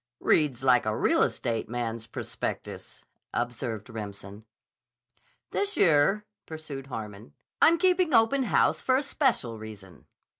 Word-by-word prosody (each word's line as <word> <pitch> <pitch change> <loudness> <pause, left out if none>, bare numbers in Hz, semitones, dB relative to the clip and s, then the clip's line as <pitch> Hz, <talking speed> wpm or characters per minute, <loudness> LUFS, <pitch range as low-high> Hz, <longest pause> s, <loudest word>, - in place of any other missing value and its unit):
"Reads 140 -5 +2
like 125 -4 +4
a 110 - 0
real - - +2
estate 115 -3 -1
man's 115 -1 -4
prospectus," - - -6 0.3
observed 120 -3 -3
Remsen. 105 -2 -8 1.1
"This 405 +1 -1
year," 170 +6 +4 0.2
pursued 155 -4 -7
Harmon, 105 - -8 0.3
"I'm 335 +1 +6
keeping 365 -2 +2
open 250 +3 +4
house - - +2
for 260 0 +2
a 275 - 0
special 240 - 0
reason. 105 -4 -12
125 Hz, 120 wpm, -27 LUFS, -, 1.1 s, I'm